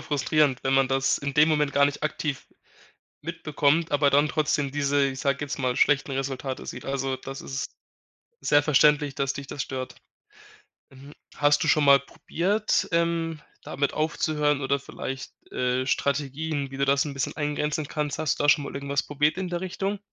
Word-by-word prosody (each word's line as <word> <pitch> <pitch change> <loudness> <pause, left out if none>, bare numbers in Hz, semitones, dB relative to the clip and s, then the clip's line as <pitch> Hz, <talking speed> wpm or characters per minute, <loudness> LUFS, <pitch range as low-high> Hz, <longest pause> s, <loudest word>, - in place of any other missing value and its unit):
frustrierend, 145 -1 +1
wenn 135 - +1
man 135 -1 +3
das 135 0 +1
in 140 -1 -4
dem 150 +1 +5
Moment 150 -2 +1
gar 140 0 +5
nicht 145 +1 -2
aktiv 150 -2 -3 0.8
mitbekommt, 160 0 0
aber 145 -1 +3
dann 145 +2 +4
trotzdem 150 -2 0
diese, 145 -1 +1
ich 130 - -7
sage 140 0 +1
jetzt 140 - -5
mal, 125 -1 0
schlechten 140 0 +2
Resultate 135 0 -4
sieht. 125 - -7
Also, 135 -1 -2
das 135 +1 -8
ist 135 +1 -4 0.7
sehr 145 0 +4
verständlich, 150 -1 +3
dass 135 0 0
dich 140 -1 -8
das 140 - -4
stört. 130 0 -5 0.9
Mhm. 135 +2 -14 0.2
Hast 145 0 +3
du 155 - 0
schon 150 0 +4
mal 140 0 +7
probiert, 195 +9 -1
ähm, 170 -1 0 0.3
damit 140 0 -1
aufzuhören 150 -2 0
oder 140 +1 +1
vielleicht, 135 0 -7 0.2
äh, 125 +1 0
Strategien, 140 +1 -1
wie 135 - -8
du 140 - +1
das 140 0 +3
'n 145 - -5
bisschen 135 -2 -3
eingrenzen 150 0 -1
kannst, 150 -1 -3
hast 155 -1 0
du - - +1
da - - +2
schon 145 -1 +5
mal 140 - -7
irgendwas 140 0 -1
probiert 150 +1 0
in 190 -1 -3
der 175 -1 -3
Richtung? 195 +2 -3
145 Hz, 180 wpm, -26 LUFS, 135-150 Hz, 0.9 s, mal